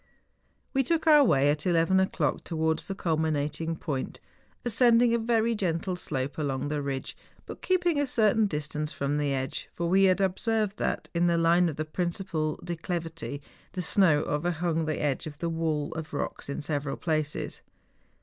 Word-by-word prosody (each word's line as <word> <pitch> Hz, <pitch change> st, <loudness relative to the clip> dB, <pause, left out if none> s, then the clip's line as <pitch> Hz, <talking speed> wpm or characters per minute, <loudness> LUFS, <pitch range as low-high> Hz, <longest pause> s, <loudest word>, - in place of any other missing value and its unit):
We 270 Hz, -, +3 dB
took 325 Hz, +5 st, 0 dB
our 300 Hz, -2 st, +7 dB
way 145 Hz, -, +4 dB
at 150 Hz, +3 st, -2 dB
eleven 175 Hz, +2 st, +3 dB
o'clock 175 Hz, -6 st, 0 dB
towards 160 Hz, -1 st, -1 dB
the 195 Hz, -, -4 dB
culminating 160 Hz, -1 st, -1 dB
point, 145 Hz, -5 st, -4 dB, 0.5 s
ascending 240 Hz, 0 st, +4 dB
a 235 Hz, -, +2 dB
very 230 Hz, 0 st, +2 dB
gentle 185 Hz, -3 st, -1 dB
slope 145 Hz, -4 st, -2 dB
along 140 Hz, -1 st, -2 dB
the 150 Hz, -1 st, -1 dB
ridge, 135 Hz, -1 st, -4 dB, 0.3 s
but -, -, -9 dB
keeping 350 Hz, -4 st, +1 dB
a 285 Hz, -, +1 dB
certain 220 Hz, -3 st, +3 dB
distance 150 Hz, -2 st, -3 dB
from 140 Hz, +1 st, -1 dB
the 145 Hz, -1 st, 0 dB
edge; 130 Hz, -1 st, -3 dB
for 170 Hz, -, -1 dB
we 190 Hz, +3 st, +4 dB
had 185 Hz, 0 st, +3 dB
observed 205 Hz, +2 st, 0 dB
that, -, -, -1 dB
in 175 Hz, 0 st, +2 dB
the 170 Hz, -1 st, +2 dB
line 170 Hz, +1 st, +4 dB
of 155 Hz, -, -5 dB
the 155 Hz, -, -3 dB
principal 170 Hz, -2 st, -2 dB
declivity, 165 Hz, -4 st, -4 dB, 0.3 s
the 180 Hz, -, -3 dB
snow 170 Hz, -6 st, +4 dB
overhung 165 Hz, +1 st, -1 dB
the 155 Hz, -1 st, -2 dB
edge 145 Hz, +2 st, -1 dB
of 150 Hz, -1 st, -8 dB
the 170 Hz, +2 st, -2 dB
wall 160 Hz, -3 st, -1 dB
of 160 Hz, -2 st, -6 dB
rocks 140 Hz, -, -4 dB
in 140 Hz, -, -4 dB
several 145 Hz, -2 st, -2 dB
places. 155 Hz, -2 st, -2 dB
165 Hz, 170 wpm, -28 LUFS, 150-190 Hz, 0.5 s, our